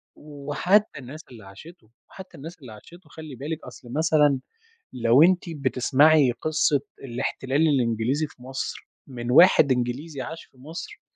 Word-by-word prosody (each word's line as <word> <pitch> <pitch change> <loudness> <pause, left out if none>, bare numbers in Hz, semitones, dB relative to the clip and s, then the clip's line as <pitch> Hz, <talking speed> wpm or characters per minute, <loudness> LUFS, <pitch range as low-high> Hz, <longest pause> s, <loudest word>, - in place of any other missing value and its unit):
وحتّى 150 +7 -1
الناس 140 +5 -10
اللي 110 -4 -13
عاشتُه 110 - -15 0.2
وحتى 190 -1 -12
الناس 165 +5 -10
اللي 125 -5 -11
عاشتُه 170 - -16
خلي 155 -3 -10
بالِك 150 +5 -6
أصل 125 -1 -12
مثلًا 150 -3 +3 0.5
لو 120 +3 +4
أنتِ 180 +1 +3
بتسمعي 140 0 +3
قصّة 155 +2 0 0.2
الاحتلال 130 +3 -2
الإنجليزي 125 +2 0
في 125 - -19
مصر، 130 +1 -6 0.2
من 125 -2 -5
واحد 150 -2 +6
إنجليزي 130 +4 -2
عاش 160 +6 -8
في - - -30
مصر، 160 - -9
140 Hz, 140 wpm, -24 LUFS, 125-160 Hz, 0.5 s, واحد